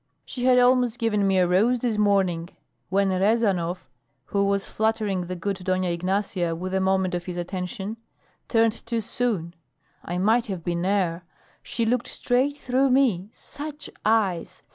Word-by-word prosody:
"She 250 -1 -4
had 255 -1 +5
almost 250 -1 +4
given 210 -4 +1
me 190 -1 +2
a 180 -1 +4
rose 215 +8 +3
this 235 -2 -1
morning, 190 -5 +1 0.4
when 195 +1 +2
Rezanov, 190 - +1 0.4
who 200 0 0
was 200 0 0
flattering 215 -5 -1
the 185 - -4
good 195 +2 -3
Dona 185 0 0
Ignacia 180 -1 -1
with 185 +3 -5
a 190 - +1
moment 190 -1 +1
of 175 0 -3
his 180 -1 -5
attention, 190 +4 -4 0.5
turned 225 -1 +2
too 230 -1 -1
soon. 210 -7 -2 0.5
I 175 - -4
might 225 +6 +2
have 185 -5 -5
been 175 +1 -1
air. 185 -4 0 0.4
She 230 - -2
looked 240 +1 0
straight 265 +4 0
through 265 0 +1
me. 240 -8 +2
Such 295 +3 -8
eyes! 185 -5 0
200 Hz, 160 wpm, -25 LUFS, 180-230 Hz, 0.5 s, had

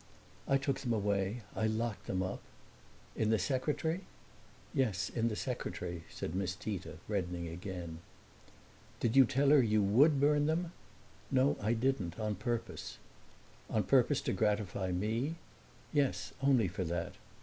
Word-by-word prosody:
"I 135 - +4
took 135 -1 -1
them 120 -3 -1
away. 100 +1 0
I 110 - +1
locked 110 0 -2
them 95 -1 0
up." 95 - -4 0.7
"In 110 - +1
the 110 - +4
secretary?" 155 - -1 0.7
"Yes, 110 -9 +1
in 115 -1 +1
the 110 - -1
secretary," 90 -9 -4
said 80 - -5
Miss 95 0 -1
Tita, 90 -8 -5
reddening 90 -4 -2
again. 85 -1 -6 1.0
"Did 115 +1 +1
you 135 -1 +9
tell 135 +3 +2
her 145 -1 +7
you 110 -3 +3
would 135 +9 +5
burn 145 +1 +4
them?" 165 +2 0 0.6
"No, 135 +1 +3
I 110 +3 +2
didn't 115 -7 0
on 110 -1 0
purpose." 115 +4 -4 0.7
"On - - +1
purpose - - +3
to - - -1
gratify 105 -3 0
me?" 110 - -1 0.6
"Yes, 145 -3 +1
only 135 -6 +4
for 90 +1 -3
that." 85 0 -2
110 Hz, 145 wpm, -34 LUFS, 95-135 Hz, 1.0 s, you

